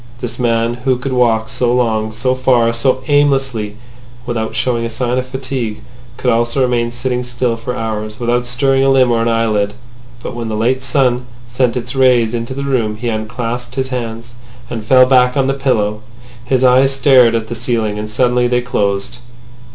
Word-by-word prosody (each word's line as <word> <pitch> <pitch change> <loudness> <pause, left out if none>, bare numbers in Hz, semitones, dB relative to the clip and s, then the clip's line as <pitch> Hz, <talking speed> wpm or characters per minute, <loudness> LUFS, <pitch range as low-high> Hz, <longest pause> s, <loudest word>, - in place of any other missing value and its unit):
This 120 0 -6
man 115 -1 +1
who 130 -1 +2
could 130 +2 -4
walk 115 -3 +2
so 120 +1 0
long, 110 -3 0
so 125 +4 0
far, 125 -3 +2
so 130 +2 0
aimlessly, 135 -7 +1 0.5
without 115 -2 -3
showing 120 -2 0
a 115 - -2
sign 125 +2 -1
of 130 - -5
fatigue, 130 -4 -4 0.4
could 125 - +1
also 120 +3 0
remain 120 -2 0
sitting 125 +1 -2
still 120 -1 -1
for 120 +2 -5
hours 110 -1 -4
without 120 0 0
stirring 135 +2 +1
a 135 - +3
limb 130 -2 +4
or 115 -1 +1
an 115 - 0
eyelid. 110 -3 0 0.5
But - - -5
when 120 -1 -5
the 110 - -2
late 125 +4 0
sun 125 -1 +1 0.2
sent 125 +1 0
its 125 - -5
rays 125 -4 +3
into 120 +2 -4
the 140 - -4
room 120 -6 0
he 120 +1 -3
unclasped 115 +2 -4
his 130 -1 -2
hands, 120 -2 -5 0.4
and 115 -2 -4
fell 130 +3 +6
back 125 0 +3
on 135 - +2
the 135 - +1
pillow. 110 -6 0 0.4
His 130 0 +1
eyes 130 +1 +5
stared 130 -4 +4
at 110 -1 -2
the 120 - -5
ceiling. 115 -3 -2
And 105 0 -5
suddenly 125 +2 +2
they 125 0 +1
closed. 100 -2 -2
120 Hz, 190 wpm, -16 LUFS, 115-130 Hz, 0.5 s, fell